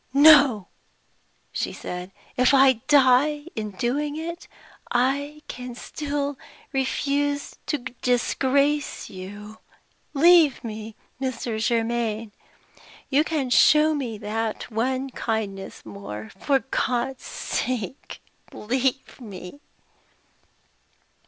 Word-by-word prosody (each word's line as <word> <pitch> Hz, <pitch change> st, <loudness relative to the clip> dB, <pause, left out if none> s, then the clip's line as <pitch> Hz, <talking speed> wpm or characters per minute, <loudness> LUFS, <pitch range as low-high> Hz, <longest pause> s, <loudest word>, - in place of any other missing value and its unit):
"No!" 280 Hz, -, +7 dB, 0.8 s
she -, -, -2 dB
said. 180 Hz, +1 st, -6 dB, 0.2 s
"If 255 Hz, +2 st, +4 dB
I 265 Hz, -4 st, +5 dB
die 290 Hz, +1 st, +4 dB
in 215 Hz, -1 st, -3 dB
doing 270 Hz, +9 st, -2 dB
it, 335 Hz, +2 st, -6 dB, 0.4 s
I 285 Hz, +4 st, 0 dB
can 250 Hz, -1 st, -7 dB
still 285 Hz, +1 st, -4 dB, 0.3 s
refuse 285 Hz, +2 st, 0 dB
to 295 Hz, -, 0 dB
disgrace 265 Hz, +3 st, 0 dB
you. 205 Hz, +3 st, -9 dB, 0.6 s
Leave 325 Hz, -2 st, +6 dB
me, 220 Hz, -1 st, -7 dB, 0.3 s
Mr. 240 Hz, -4 st, -2 dB
Germaine. 230 Hz, -1 st, 0 dB, 0.8 s
You 285 Hz, +3 st, +4 dB
can 295 Hz, -6 st, -2 dB
show 305 Hz, +4 st, +6 dB
me 250 Hz, -7 st, -3 dB
that 220 Hz, +2 st, -3 dB
one 260 Hz, +4 st, -1 dB
kindness 210 Hz, -5 st, -4 dB
more. 105 Hz, +1 st, -8 dB
For 275 Hz, +8 st, +2 dB
God's 250 Hz, +1 st, -1 dB
sake, 250 Hz, -1 st, -4 dB, 0.3 s
leave 260 Hz, +4 st, -2 dB
me!" 195 Hz, +2 st, -9 dB
255 Hz, 95 wpm, -24 LUFS, 220-285 Hz, 0.8 s, No